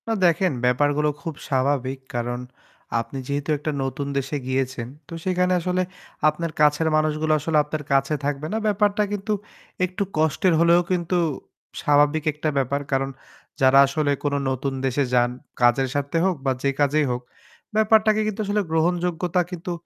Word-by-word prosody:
না 225 - +1
দেখেন 175 +1 +3
ব্যাপারগুলো 145 +4 +2
খুব 165 -2 -4 0.2
স্বাভাবিক। 135 -1 0 0.2
কারন 120 +1 -2 0.6
আপনি 115 +4 -5
যেহেতু 140 +1 -3
একটা 150 +2 -3
নতুন 135 +2 -3
দেশে 140 +2 -2
গিয়েছেন 130 -2 -1 0.2
তো - - -10
সেখানে 180 0 +2
আসলে 180 +1 0 0.5
আপনার 165 +2 -4
কাছের 150 +2 +4
মানুষগুলো 155 0 +1
আসলে 155 +2 0
আপনার 150 0 -5
কাছে 135 +2 +2
থাকবে 145 +1 -2
না - - +1
ব্যাপারটা 210 0 +2
কিন্তু 205 +1 -3 0.5
একটু 185 +2 -3
কষ্টের 160 +3 +2
হলেও 170 +1 +5
কিন্তু 180 0 0 0.6
স্বাভাবিক 145 +1 +3
একটা 155 +1 -2
ব্যাপার 140 +1 0
কারণ। 135 0 +1 0.5
যারা 135 +1 +6
আসলে 145 +1 0
কোন 145 -1 0 0.2
নতুন 130 +1 -2
দেশে 135 +2 +1
যান 120 -1 +4 0.3
কাজের 120 +2 +4
স্বার্থে 145 +3 -1
হোক 190 -2 +2
বা 135 - +3
যে 140 - +3
কাজেই 145 +1 +3
হোক, 125 0 -2 0.5
ব্যাপারটাকে 215 0 +4
কিন্তু 215 0 -3
আসলে 205 +1 +1
গ্রহণযোগ্যতা 175 +1 +1
কিন্তু 180 0 -5
150 Hz, 155 wpm, -23 LUFS, 135-175 Hz, 0.6 s, যারা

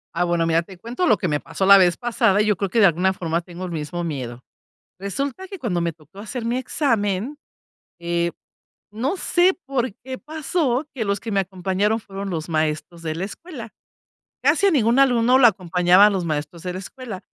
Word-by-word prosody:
Ah, 175 - +1
bueno, 170 -1 +1
mira, 165 0 +2
te 185 +1 -13
cuento 245 - -2
lo - - +5
que 185 - -2
me 145 -1 0
pasó 190 - -3
la 200 0 +9
vez 175 -2 +3
pasada 230 -4 +2
y 210 - +3
yo 210 -2 +2
creo 195 +2 -2
que 230 - +1
de 200 - +7
alguna 185 +2 +3
forma 170 -2 -2
tengo 175 +1 -8
el 175 - -6
mismo 165 +2 -4
miedo. 125 -6 -5 0.6
Resulta 275 - -4
que 390 0 -8
cuando 195 - -2
me 170 - 0
tocó 160 +4 -17
hacer 225 +3 -5
mi 240 +2 0
examen, 230 -3 -1 0.6
eh, 170 0 -1 0.6
no 255 - -1
sé 360 0 +3 0.2
por 255 -5 -1
qué 260 0 -6
pasó 305 -3 -1
que 225 -4 -2
los 200 0 0
que 225 +1 -6
me 195 - +2
acompañaron 190 +4 -1
fueron 195 -2 -6
los 160 0 -4
maestros 155 +2 -2
de 155 -1 -2
la 175 +4 -3
escuela. 260 - -9 0.7
Casi 400 - +3
a - - +4
ningún 235 -4 +3
alumno 250 -2 +4
lo 260 - +6
acompañaban 180 0 +5
los 185 -3 -1
maestros 160 +2 -4
de 180 -1 -4
la 185 - -5
escuela. 225 -2 -8
195 Hz, 205 wpm, -22 LUFS, 170-240 Hz, 0.7 s, la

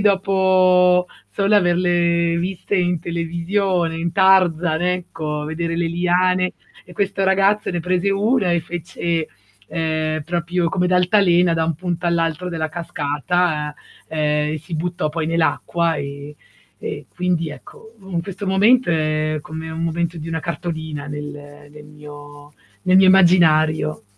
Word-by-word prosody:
dopo, 185 -2 +3 0.2
solo 200 +1 +1
averle 175 -2 +2
viste 190 +3 -2
in 180 -1 +1
televisione, 170 +1 -1
in 170 +1 -2
Tarzan, 180 -4 +3
ecco. 165 -4 -3
Vedere 165 +2 -3
le 170 0 0
liane 180 +2 +1 0.3
e 180 - -15
questo 195 +1 -1
ragazzo 195 +2 +2
ne 175 - -2
prese 180 +3 0
1 205 0 +1
e 170 - +1
fece, 170 -1 -3 0.4
ehm, 155 -1 -2
proprio 175 +2 -1
come 180 +1 0
d'altalena 180 -2 +3
da 165 0 +1
un 165 -1 -1
punto 175 +1 -3
all'altro 165 +1 0
della 160 -2 -3
cascata, 155 -1 -2 0.3
ehm, 150 -1 0
si 160 +2 -8
buttò 170 -1 -2
poi 160 +1 -3
nell'acqua 165 +1 0
e 140 +1 -7 0.4
e - - -6
quindi, 175 -2 -1
ecco, 220 +8 -13 0.2
in 170 -2 -1
questo 195 +3 -7
momento 210 +4 +4
è 155 -1 0
come 160 +2 -7
un 160 +1 -5
momento 170 +1 -2
di 160 +1 -7
una 165 0 -3
cartolina 160 -3 -5
nel 145 0 -9
nel 150 0 -13
mio 145 -1 -13 0.3
nel 185 - +3
mio 190 - +6
immaginario. 160 -7 +4
170 Hz, 135 wpm, -20 LUFS, 155-180 Hz, 0.4 s, mio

